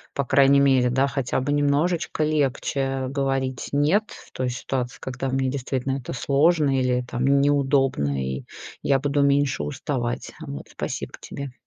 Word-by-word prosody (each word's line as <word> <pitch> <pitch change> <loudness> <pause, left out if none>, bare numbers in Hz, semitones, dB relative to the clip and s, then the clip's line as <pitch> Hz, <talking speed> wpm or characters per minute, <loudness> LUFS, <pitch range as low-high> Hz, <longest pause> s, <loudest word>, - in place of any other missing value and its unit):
по 140 - 0
крайней 140 +2 +5
мере, 130 -3 +4
да, 130 +2 +2
хотя 135 -3 -1
бы 135 +2 -2
немножечко 155 +3 +1
легче, 135 -2 0
говорить 135 -2 -2
нет 155 +10 +3
в - - -13
той 130 -1 -2
ситуации, 125 0 -3
когда 130 0 -4
мне 130 0 0
действительно 135 0 -2
это 120 - -7
сложно 140 +1 +2
или 125 -1 +1
там 125 +2 -2
неудобно 135 - +2
и 65 0 -4 0.4
я 135 - +3
буду 145 +1 0
меньше 140 - +2
уставать, 120 - -3 0.2
вот. 70 0 -6
Спасибо - - -5
тебе. 140 -2 -7
135 Hz, 150 wpm, -24 LUFS, 125-140 Hz, 0.4 s, крайней